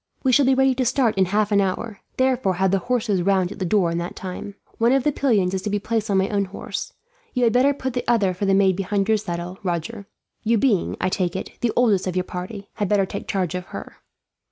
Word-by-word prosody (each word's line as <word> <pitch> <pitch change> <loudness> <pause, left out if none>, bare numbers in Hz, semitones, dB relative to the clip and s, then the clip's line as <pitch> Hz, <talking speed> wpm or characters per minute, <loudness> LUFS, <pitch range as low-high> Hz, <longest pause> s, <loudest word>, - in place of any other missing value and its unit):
"We 260 - +3
shall 265 +1 +4
be 265 - +4
ready 265 0 +4
to 255 +1 0
start 250 -2 +2
in 190 -1 +3
half 210 +3 0
an 200 -1 +4
hour, 200 +2 -3 0.2
therefore 255 -7 +2
have 190 +1 +1
the 195 - +2
horses 220 -3 0
round 190 0 +2
at - - -9
the 190 - -1
door 180 -2 +2
in 170 - -1
that 170 +1 -5
time. 190 +2 -7 0.2
One 235 +2 +4
of 270 -1 +2
the 295 - +2
pillions 210 -10 +1
is 190 - -1
to 210 - -3
be 205 - 0
placed 220 +1 -2
on 195 - +2
my 190 0 +2
own 200 -2 0
horse. 190 - -6 0.4
You 250 - +2
had 230 -2 +3
better 260 +3 +4
put 265 -2 -4
the 245 - -2
other 205 -6 +3
for 195 +3 -2
the 195 - +4
maid 190 -1 +4
behind 195 +1 -1
your 220 0 +4
saddle, 180 -2 -5
Roger; 195 +3 -4 0.3
you 230 +1 +2
being, 220 -6 +1
I 185 - +1
take 180 -2 -1
it, 190 - -4
the 240 - +1
oldest 215 -7 +3
of 185 - -2
your 185 - +1
party, 190 +3 -7
had 205 -3 -1
better 200 -2 +3
take 200 - -7
charge 185 -3 -1
of 180 0 -4
her." - - -9
200 Hz, 255 wpm, -23 LUFS, 185-235 Hz, 0.4 s, shall